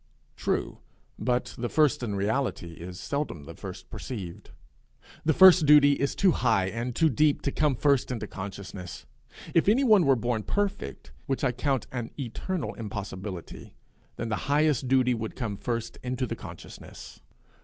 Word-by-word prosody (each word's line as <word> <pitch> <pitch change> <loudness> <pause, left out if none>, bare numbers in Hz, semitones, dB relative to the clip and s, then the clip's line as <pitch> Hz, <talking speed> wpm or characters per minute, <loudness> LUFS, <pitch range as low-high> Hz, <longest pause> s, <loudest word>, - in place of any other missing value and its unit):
True; - - -2 0.4
but 125 0 -1
the 120 0 -2
first 150 -5 +3
in 110 -5 -2
reality 105 -3 -1
is 90 +2 -9
seldom 140 - -3
the - - -9
first - - -9
perceived. 95 -9 -7 0.7
The 160 - +3
first 185 -4 +8
duty 145 -1 +8
is 140 0 -1
too 195 -2 +4
high 110 - +2
and 115 +3 -4
too 165 - +4
deep 150 +2 +2
to 140 - 0
come 150 -2 +1
first 140 0 +2
into 115 -4 -3
consciousness. 95 -6 -8 0.5
If 165 +3 +4
any 245 +6 +4
one 210 - +5
were 135 - +6
born 120 -1 -1
perfect, 195 - -3 0.2
which 135 - -1
I 130 - +3
count 130 0 -1
an 120 -3 -4
eternal 150 +8 -3
impossibility, 100 -4 -7 0.4
then 115 - -4
the 110 +5 -3
highest 145 -3 +2
duty 130 -1 +3
would 110 -2 -4
come 115 -6 -3
first 115 +1 -4
into 130 0 -2
the - - -4
consciousness. - - -11
125 Hz, 160 wpm, -27 LUFS, 105-145 Hz, 0.7 s, first